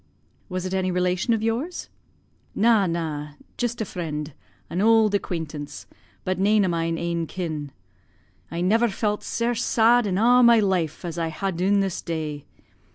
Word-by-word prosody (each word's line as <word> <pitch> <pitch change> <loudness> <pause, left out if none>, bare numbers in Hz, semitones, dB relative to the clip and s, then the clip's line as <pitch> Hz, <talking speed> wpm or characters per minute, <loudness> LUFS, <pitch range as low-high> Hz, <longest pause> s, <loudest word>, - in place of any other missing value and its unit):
"Was 185 0 -3
it 185 - -3
any 190 -1 0
relation 180 +4 0
of 225 -1 +1
yours?" 245 +11 -2 0.7
"Na, 215 -2 +4
na, 155 -3 -3 0.2
jist 240 -1 -2
a - - -1
freend, 150 -5 -5 0.3
an 180 - -2
auld 220 -1 +4
acquaintance, 160 -7 -4 0.4
but 185 0 -2
nane 205 +1 +4
o' - - +1
mine 165 -1 -1
ain 170 -1 -2
kin. 155 -6 -4 0.8
I 170 +2 -4
never 225 +6 +3
felt 210 +1 -1
sare 235 +1 -1
sad 235 0 +3
in 185 -2 0
a' 245 +4 +5
my 235 -1 +7
life, 180 -5 0
as 170 0 -4
I 165 -1 -1
ha' 195 +4 -2
dune 195 +3 +2
this 195 -2 -2
day. 155 -4 -4
185 Hz, 160 wpm, -24 LUFS, 165-220 Hz, 0.8 s, my